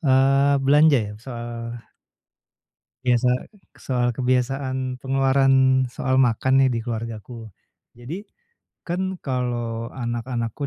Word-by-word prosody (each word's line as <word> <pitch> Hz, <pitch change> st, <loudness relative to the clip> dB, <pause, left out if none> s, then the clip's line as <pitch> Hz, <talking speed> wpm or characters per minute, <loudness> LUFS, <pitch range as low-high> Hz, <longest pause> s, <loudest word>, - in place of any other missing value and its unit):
eee, 135 Hz, -1 st, +4 dB
belanja 145 Hz, 0 st, +5 dB
ya 105 Hz, -2 st, -4 dB
soal 120 Hz, -1 st, -6 dB, 1.3 s
biasa 125 Hz, 0 st, +3 dB, 0.5 s
soal 125 Hz, -2 st, -1 dB
kebiasaan 130 Hz, 0 st, -1 dB
pengeluaran 135 Hz, -1 st, +3 dB
soal 130 Hz, 0 st, -1 dB
makan 130 Hz, +2 st, +3 dB
nih 130 Hz, -, +3 dB
di 115 Hz, -, -1 dB
keluargaku, 115 Hz, 0 st, -6 dB, 0.4 s
jadi, 145 Hz, -, -8 dB, 0.6 s
kan 185 Hz, +2 st, -2 dB
kalau 120 Hz, -3 st, -3 dB
anak-anakku 120 Hz, +1 st, -3 dB
130 Hz, 95 wpm, -23 LUFS, 120-135 Hz, 1.3 s, belanja